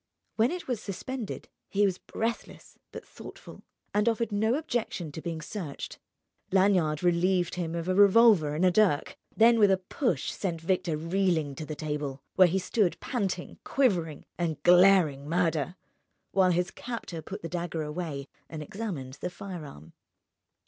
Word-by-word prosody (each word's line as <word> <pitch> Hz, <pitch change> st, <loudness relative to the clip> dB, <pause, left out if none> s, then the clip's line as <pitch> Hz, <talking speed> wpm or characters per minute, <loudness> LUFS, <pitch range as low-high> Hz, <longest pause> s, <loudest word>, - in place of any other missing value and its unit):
When 225 Hz, +2 st, +3 dB
it 355 Hz, +2 st, -5 dB
was 245 Hz, -5 st, -2 dB
suspended, 220 Hz, +4 st, -5 dB, 0.2 s
he 205 Hz, +1 st, +3 dB
was 185 Hz, -2 st, 0 dB
breathless 230 Hz, +1 st, -5 dB
but -, -, -9 dB
thoughtful, -, -, -12 dB, 0.3 s
and 210 Hz, +3 st, +3 dB
offered 230 Hz, 0 st, -1 dB
no 220 Hz, +4 st, +2 dB
objection 235 Hz, -, -3 dB
to 160 Hz, -, -7 dB
being 165 Hz, -2 st, -4 dB
searched. 165 Hz, -6 st, -6 dB, 0.5 s
Lanyard 185 Hz, -5 st, +3 dB
relieved 175 Hz, 0 st, +2 dB
him 170 Hz, -2 st, -3 dB
of 170 Hz, 0 st, -3 dB
a 185 Hz, -, +2 dB
revolver 200 Hz, -6 st, +6 dB
and 170 Hz, +5 st, +2 dB
a 180 Hz, -, +5 dB
dirk, 185 Hz, -6 st, +2 dB, 0.2 s
then 230 Hz, +1 st, +6 dB
with 205 Hz, -2 st, +6 dB
a 190 Hz, -, +4 dB
push 185 Hz, -, -1 dB
sent 175 Hz, -4 st, -3 dB
Victor 165 Hz, -1 st, 0 dB
reeling 165 Hz, -3 st, 0 dB
to 155 Hz, +3 st, -7 dB
the 155 Hz, -, -5 dB
table, 145 Hz, -2 st, -4 dB
where 185 Hz, -, +6 dB
he 180 Hz, +3 st, 0 dB
stood 190 Hz, 0 st, 0 dB
panting, 195 Hz, -8 st, -3 dB
quivering, 175 Hz, -, 0 dB
and 160 Hz, -4 st, -2 dB
glaring 175 Hz, -6 st, +5 dB
murder, 165 Hz, -1 st, 0 dB, 0.6 s
while 190 Hz, -1 st, +4 dB
his 180 Hz, +1 st, +1 dB
captor 230 Hz, -9 st, -6 dB
put 155 Hz, -, -8 dB
the -, -, -3 dB
dagger 170 Hz, -2 st, -3 dB
away 150 Hz, -3 st, -5 dB, 0.2 s
and 155 Hz, -2 st, -6 dB
examined 150 Hz, -9 st, -6 dB
the 180 Hz, -, -2 dB
firearm. 155 Hz, -, -9 dB
180 Hz, 155 wpm, -28 LUFS, 160-205 Hz, 0.6 s, revolver